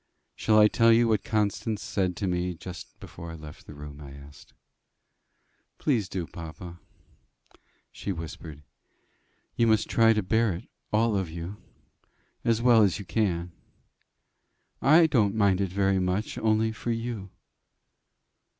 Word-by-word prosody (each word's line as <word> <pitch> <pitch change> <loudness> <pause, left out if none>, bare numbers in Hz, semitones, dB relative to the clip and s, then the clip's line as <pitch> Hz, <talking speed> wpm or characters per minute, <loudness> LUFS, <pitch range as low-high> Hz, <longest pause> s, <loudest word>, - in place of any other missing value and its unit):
"Shall 110 - +2
I 105 0 +8
tell 115 +2 +4
you 115 +1 +5
what 110 -4 +1
Constance 105 0 -1
said 95 -3 -1
to 100 - -3
me 90 0 -1
just 90 +1 -10
before 85 - -10
I 80 - -7
left 75 -2 -12
the - - -10
room?" 75 0 -10
I 70 - -9
asked. 70 +1 -15 1.2
"Please 115 -10 0
do, 90 -3 -3
papa." 85 +1 -9 1.1
"She 100 - -5
whispered, 80 -3 -8 0.9
'You 115 - +3
must 110 -2 +3
try 115 -1 +4
to 105 -2 0
bear 110 +2 +2
it, 85 +7 -8 0.2
all 110 0 +2
of 95 -4 -1
you, 85 +5 -7 0.9
as 115 0 +1
well 120 -3 +6
as 100 -4 +3
you 100 - -8
can. 90 -2 -1 1.3
I 160 +4 +6
don't 110 -10 +2
mind 100 -3 +3
it 95 - 0
very 95 0 +1
much, 90 +3 -1
only 110 0 +2
for 110 +2 -6
you. 115 -4 -3
100 Hz, 145 wpm, -27 LUFS, 85-110 Hz, 1.3 s, I